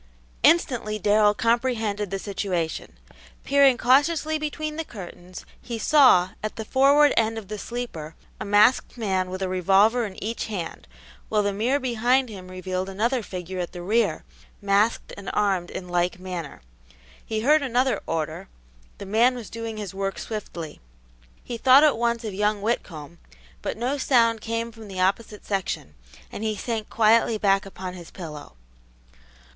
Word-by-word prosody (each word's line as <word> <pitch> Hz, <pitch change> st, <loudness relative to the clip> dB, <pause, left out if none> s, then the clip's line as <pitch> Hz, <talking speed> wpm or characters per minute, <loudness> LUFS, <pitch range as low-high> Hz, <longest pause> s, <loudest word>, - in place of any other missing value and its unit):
Instantly 245 Hz, -10 st, +3 dB
Darrell 210 Hz, +1 st, +3 dB
comprehended 225 Hz, -3 st, 0 dB
the 195 Hz, -, -2 dB
situation. 190 Hz, -, -3 dB, 0.5 s
Peering 275 Hz, -3 st, +4 dB
cautiously 310 Hz, +4 st, +2 dB
between 305 Hz, 0 st, -4 dB
the 325 Hz, -, -3 dB
curtains, 180 Hz, -, -10 dB, 0.2 s
he 235 Hz, -2 st, -5 dB
saw, 245 Hz, -8 st, +5 dB
at 215 Hz, -, -4 dB
the 220 Hz, -, -6 dB
forward 280 Hz, +4 st, +5 dB
end 225 Hz, 0 st, +1 dB
of 205 Hz, -4 st, -8 dB
the 210 Hz, -1 st, -5 dB
sleeper, 195 Hz, -12 st, -6 dB, 0.2 s
a -, -, -3 dB
masked 210 Hz, +5 st, +3 dB
man 190 Hz, -5 st, -1 dB
with 185 Hz, +1 st, -4 dB
a -, -, 0 dB
revolver 195 Hz, +6 st, +3 dB
in 190 Hz, -, -11 dB
each 230 Hz, +3 st, -3 dB
hand, 190 Hz, -6 st, -6 dB, 0.4 s
while 210 Hz, -1 st, +2 dB
the 205 Hz, 0 st, 0 dB
mirror 240 Hz, +8 st, +1 dB
behind 250 Hz, 0 st, +1 dB
him 190 Hz, -4 st, -9 dB
revealed 185 Hz, 0 st, -4 dB
another 235 Hz, +6 st, 0 dB
figure 185 Hz, -2 st, -6 dB
at 175 Hz, -, -4 dB
the 175 Hz, -, -7 dB
rear, 215 Hz, +3 st, +1 dB, 0.4 s
masked 200 Hz, +3 st, +1 dB
and 200 Hz, -, -6 dB
armed 190 Hz, -4 st, +1 dB
in 180 Hz, -, -7 dB
like 175 Hz, 0 st, 0 dB
manner. 175 Hz, -, -7 dB, 0.6 s
He 220 Hz, -1 st, -3 dB
heard 300 Hz, +6 st, +4 dB
another 255 Hz, -1 st, +1 dB
order; 165 Hz, +3 st, -3 dB, 0.5 s
the -, -, -8 dB
man 230 Hz, +6 st, +3 dB
was 235 Hz, -4 st, -8 dB
doing 230 Hz, -1 st, -5 dB
his 205 Hz, -3 st, -6 dB
work 195 Hz, 0 st, -3 dB
swiftly. 175 Hz, -8 st, -6 dB, 0.6 s
He 235 Hz, -1 st, -6 dB
thought 265 Hz, +4 st, +7 dB
at 305 Hz, -, +5 dB
once 235 Hz, 0 st, 0 dB
of 215 Hz, -3 st, -4 dB
young 210 Hz, +1 st, 0 dB
Whitcomb, 170 Hz, -8 st, -3 dB, 0.4 s
but -, -, -4 dB
no 255 Hz, +5 st, -1 dB
sound 230 Hz, -4 st, +3 dB
came 230 Hz, +1 st, -3 dB
from 225 Hz, -1 st, -12 dB
the 190 Hz, -2 st, -7 dB
opposite 205 Hz, +3 st, -1 dB
section, 190 Hz, -, -3 dB, 0.4 s
and -, -, -6 dB
he 215 Hz, -1 st, -1 dB
sank 220 Hz, 0 st, -4 dB
quietly 225 Hz, 0 st, +3 dB
back 195 Hz, -1 st, +2 dB
upon 185 Hz, -1 st, -7 dB
his 175 Hz, -2 st, -10 dB
pillow. 150 Hz, -5 st, -9 dB
215 Hz, 160 wpm, -24 LUFS, 190-235 Hz, 0.6 s, thought